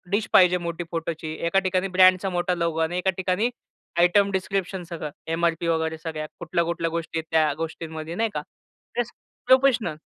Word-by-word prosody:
Dish 215 - -1
पाहिजे 180 -1 +6
मोठी 170 +1 -3
फोटोची. 165 -1 -3
एका 170 +3 +3
ठिकाणी 185 +1 0
ब्रँडचा 185 +1 +6
मोठा 180 0 0
लोगो 170 -2 -1
आणि 165 +2 0
एका 180 +1 +1
ठिकाणी 185 +6 +1 0.5
आयटम 200 +3 +4
डिस्क्रिप्शन 190 -1 -2
सगळं, 155 -3 -5 0.2
एम-आर-पी 170 0 0
वगैरे 160 -1 0
सगळ्या. 155 -1 -5
कुठल्या-कुठल्या 170 0 -1
गोष्टी 165 0 -3
आहेत 160 - -6
त्या 155 -2 +3
गोष्टींमध्ये, 160 0 -6
नाही 225 +3 +1
का. - - -2
ते - - -30
प्रेस 240 -1 -2 0.4
प्रोफेशनल. 255 - +4
170 Hz, 165 wpm, -25 LUFS, 165-190 Hz, 0.5 s, पाहिजे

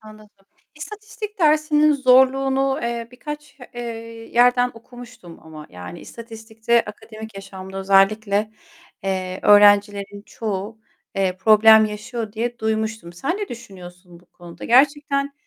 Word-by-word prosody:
Anladım. 215 -2 -17 0.3
İstatistik 425 +5 -9
dersinin 305 -1 +3
zorluğunu, 270 0 +3
eee, 235 -1 -4
birkaç, 295 +2 -9 0.2
eee, 240 - -6 0.5
yerden 245 +1 +3
okumuştum 240 -7 -14
ama 155 -1 -12
yani 90 0 -10
istatistikte 225 0 -3
akademik 220 +1 -11
yaşamda 195 -1 -9
özellikle, 200 +2 +2 0.5
eee, 185 -1 -3
öğrencilerin 205 -1 +4
çoğu, 215 0 -5 0.4
eee, 190 -2 -1
problem 220 +2 +6
yaşıyor 215 +1 -6
diye 235 +2 -4
duymuştum. 220 -5 -3
Sen 275 - -3
ne 415 -1 -5
düşünüyorsun 180 -6 -12
bu 180 - -27
konuda? 175 -2 -13
Gerçekten, 280 +2 +2
220 Hz, 110 wpm, -21 LUFS, 195-255 Hz, 0.5 s, problem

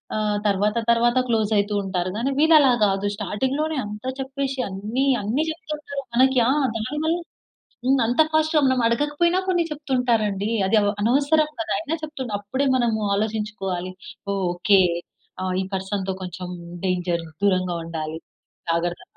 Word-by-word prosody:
ఆహ్, 210 -1 0
తర్వాత 205 +2 +1
తర్వాత 235 +1 +3
క్లోస్ 220 -3 +1
అయితూ 205 +1 +1
ఉంటారు. 185 -2 -2
గానీ 250 +5 0
వీళ్ళు 320 +2 +6
అలా 280 -4 +6
గాదు. 195 0 +2
స్టార్టింగ్‌లోనే 265 +10 -1
అంతా 210 +4 -5
చెప్పేషి 270 0 -3
అన్ని 210 +8 -2 0.2
అన్ని 225 +9 0
చెప్తూ 320 -1 -7
ఉంటారు 285 -2 -6
మనకి. 260 +1 +4
ఆ! - - +4 0.2
దానివల్ల 295 +9 -1 0.7
హ్మ్. 270 +1 +4
అంత 245 +6 +3
ఫాస్ట్‌గా 315 0 +3
మనం 260 -1 +2
అడగకపోయినా 295 +9 +1
కొన్ని 355 -2 +2
చెప్తూ 295 -2 -7
ఉంటారండి. 215 -4 +1 0.2
అది 220 - +3
అవ్ 205 - +2
అనవసరం 290 +6 +3
గదా! 225 - -4
అయినా 300 +10 -3
చెప్తు 300 -4 -5
అప్పుడే 260 +8 -1
మనము 235 -3 +1 0.2
ఆలోచించుకోవాలి. 200 -4 -3 0.4
ఓహ్! 195 -1 -1
ఓకే. 195 +2 +4 0.6
ఆ! - - -2 0.2
ఈ - - -5
పర్సన్‌తో 190 0 -2
కొంచెం 180 0 -6 0.4
డేంజర్. 175 -2 -1 0.2
దూరంగా 185 -3 +2
ఉండాలి. 160 -1 -5 0.5
జాగ్రత్త 170 +1 -1
220 Hz, 145 wpm, -23 LUFS, 195-275 Hz, 0.7 s, వీళ్ళు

